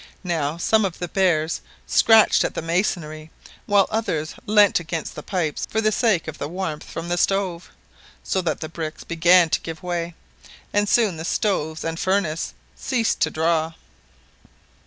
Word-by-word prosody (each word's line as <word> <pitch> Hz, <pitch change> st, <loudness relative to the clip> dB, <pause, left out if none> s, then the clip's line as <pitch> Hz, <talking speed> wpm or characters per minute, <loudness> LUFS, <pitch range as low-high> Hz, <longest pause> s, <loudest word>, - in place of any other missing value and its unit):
Now 165 Hz, -4 st, -1 dB
some 220 Hz, +5 st, +2 dB
of 185 Hz, -3 st, -2 dB
the 175 Hz, -, -4 dB
bears 170 Hz, -4 st, +1 dB, 0.2 s
scratched 225 Hz, -1 st, +5 dB
at -, -, -3 dB
the -, -, -3 dB
masonry, 165 Hz, -3 st, -2 dB, 0.4 s
whilst 200 Hz, -2 st, +3 dB
others 160 Hz, -8 st, -1 dB
leant 205 Hz, -2 st, +5 dB
against 165 Hz, -1 st, -5 dB
the 150 Hz, -, -7 dB
pipes 160 Hz, -4 st, -2 dB
for 220 Hz, -, -1 dB
the 215 Hz, -1 st, +2 dB
sake 215 Hz, -7 st, +1 dB
of 160 Hz, -, -7 dB
the 145 Hz, -, -3 dB
warmth 165 Hz, -2 st, -4 dB
from 165 Hz, +1 st, -6 dB
the 175 Hz, 0 st, -1 dB
stove; 190 Hz, -3 st, 0 dB, 0.5 s
so 190 Hz, -, 0 dB
that 160 Hz, -4 st, -2 dB
the 160 Hz, -, -3 dB
bricks 160 Hz, -1 st, -6 dB
began 170 Hz, 0 st, +4 dB
to -, -, +1 dB
give 165 Hz, 0 st, -7 dB
way, 175 Hz, -1 st, -3 dB, 0.6 s
and 205 Hz, 0 st, +2 dB
soon 215 Hz, -8 st, +3 dB
the 160 Hz, -, -5 dB
stoves 160 Hz, -4 st, -1 dB
and 165 Hz, 0 st, -3 dB
furnace 185 Hz, -5 st, -1 dB, 0.2 s
ceased 235 Hz, -4 st, -1 dB
to -, -, +2 dB
draw. 160 Hz, 0 st, 0 dB
170 Hz, 165 wpm, -22 LUFS, 160-195 Hz, 0.6 s, scratched